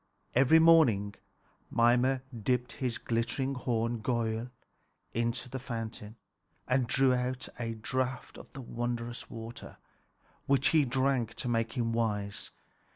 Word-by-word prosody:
Every 135 +5 +6
morning 150 -12 +5 0.6
Mimer 125 +3 +3
dipped 125 +2 0
his 125 -4 -2
glittering 120 +4 -1
horn 115 -2 -1
Giöll 115 0 -1 0.6
into 120 +2 -1
the 130 +2 -5
fountain 115 -3 -6 0.5
and 125 -1 +2
drew 130 +1 +4
out 125 +1 -2
a 115 -1 -3
draught 125 +3 -3
of - - -13
the 135 - -7
wondrous 120 0 -4
water, 115 0 -8 0.7
which 135 0 +3
he 155 -3 +4
drank 130 -3 0
to - - -4
make 115 -1 0
him 115 -2 -1
wise. 105 -3 -1
120 Hz, 125 wpm, -31 LUFS, 115-130 Hz, 0.7 s, Every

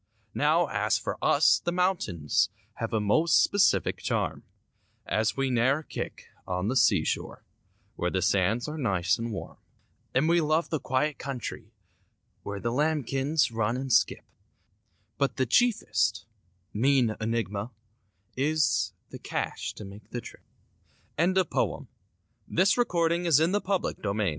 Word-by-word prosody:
Now, - - +3
as - - 0
for - - -5
us, - - +4
the 175 - -2
mountains 170 - +1 0.3
Have 115 - -3
a 110 - +1
most 155 +11 +3
specific 200 -1 +2
charm, - - -2 0.6
And 110 +1 +1
we 135 -1 0
ne'er 130 +6 +2
kick - - -6 0.2
on 90 +2 -1
the 130 - -1
seashore, 120 - +1 0.5
Where 90 - 0
the 95 0 -1
sands 105 +7 +1
are 155 +1 -5
nice 100 -5 +1
and 115 0 -3
warm; 105 - -7 0.6
And 135 +5 +3
we 170 +1 +4
love 155 +2 0
the 155 - 0
quiet 135 +4 -1
country 135 -5 -6 0.7
Where 100 0 -5
the 115 +3 -2
lambkins 145 0 +1
run 115 +1 -1
and 130 -1 -2
skip— 120 - +2 0.9
But 140 - +1
the 130 - +2
chiefest, 110 - +1 0.5
mean 125 -1 +2
enigma 110 -1 -2 0.7
Is—the 135 -8 -1
cash - - -4
to 105 - -8
make 100 +2 -12
the 120 - -4
trip. - - -12 0.8
AN 175 +3 +3
AWFUL 190 - +4
HALLOWE'EN - - -1 0.6
(absolutely 175 -4 +2
untrue) 180 +5 +2 0.3
Way - - -5
bac 105 -2 +1
130 Hz, 135 wpm, -27 LUFS, 110-160 Hz, 0.9 s, us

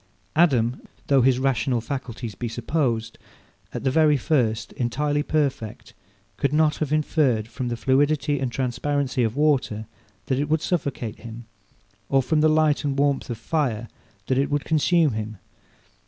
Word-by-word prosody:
Adam, 130 -7 +3 0.2
though 135 -2 +4
his 125 0 +4
rational 130 -2 +1
faculties 120 -2 -5
be 120 +5 -4
supposed, 115 -1 -2 0.5
at - - -5
the 135 - +2
very 150 0 +4
first, 120 -6 0
entirely 145 +4 0
perfect, 140 -8 -2 0.4
could 140 - 0
not 150 0 +2
have 150 -2 -2
inferred 145 -7 +1
from 120 +2 -5
the 120 -1 -2
fluidity 145 +3 +1
and 130 -2 -2
transparency 135 +1 -1
of 110 0 -1
water 135 -7 +1 0.4
that 130 - 0
it 145 +1 -1
would 155 0 +1
suffocate 135 - -2
him, 115 0 -9 0.6
or 135 -1 +3
from 150 +5 +1
the 155 - +5
light 155 -1 +2
and 140 -2 -1
warmth 140 -1 +1
of 120 - -3
fire 120 -4 -2 0.4
that 130 0 +1
it 140 - +1
would 145 -1 -1
consume 160 0 +3
him. 110 -1 -5
135 Hz, 155 wpm, -24 LUFS, 120-150 Hz, 0.6 s, the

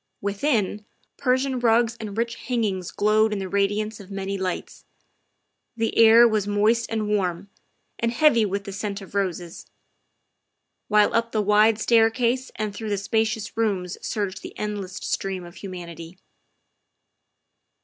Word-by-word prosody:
Within, 205 0 -1 0.3
Persian 260 0 +1
rugs 230 0 +3
and 210 -1 -6
rich 235 0 0
hangings 215 -8 -2
glowed 215 +1 +2
in 210 - -1
the 190 -1 -4
radiance 205 +3 -1
of 200 -2 -12
many 195 0 -4
lights; 190 -2 -4 0.9
the 225 0 -1
air 230 +1 +8
was 215 -3 0
moist 215 +3 +2
and 220 -2 -2
warm, 195 -2 -1 0.5
and 230 0 0
heavy 240 -3 +4
with 200 -1 -2
the 200 - -7
scent 205 0 -4
of 195 - -12
roses; 180 -4 -3 1.2
while 210 -1 +4
up 230 0 +1
the 215 - +1
wide 210 +2 +4
staircase 235 +3 +2
and 215 -2 -3
through 220 +1 -5
the 205 - 0
spacious 220 +2 -1
rooms 195 -6 -1
surged 200 -4 -3
the - - -10
endless 205 -3 -4
stream 190 -2 -3
of 175 +2 -13
humanity. 175 -2 -8
210 Hz, 140 wpm, -24 LUFS, 195-225 Hz, 1.2 s, air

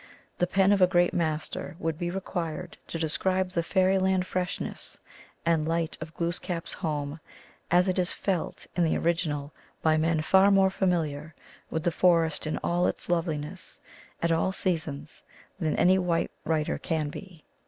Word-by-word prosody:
The 180 - +2
pen 195 +2 +3
of 200 -2 +3
a 180 - +7
great 175 -1 +3
master 155 -1 -2
would 165 -2 -2
be 175 -1 -1
required 175 -2 -4
to - - -4
describe 185 +4 0
the 170 - +1
fairyland 190 +1 +2
freshness 185 0 -4 0.5
and 165 -2 +2
light 165 0 0
of 155 +1 -7
Glooskap 170 0 -2
s - - +3
home 150 -3 -3 0.5
as 180 +2 +4
it 185 0 +1
is 180 - +3
felt 185 -4 -2
in 175 - +2
the 160 - +2
original 155 -4 -1 0.3
by 155 -1 +4
men 160 0 +1
far 190 +4 +5
more 195 -1 +5
familiar 160 -5 -1 0.3
with 160 - -2
the 175 - +2
forest 165 -2 +2
in 155 - -1
all 175 +1 +2
its - - -3
loveliness 165 0 -2 0.4
at 170 - +2
all 165 +3 +2
seasons 160 -6 -2 0.4
than 155 -4 0
any 185 +1 +4
white 175 -2 0
writer 155 -2 0
can 160 -4 -1
be. 175 0 -10
170 Hz, 165 wpm, -28 LUFS, 160-185 Hz, 0.5 s, a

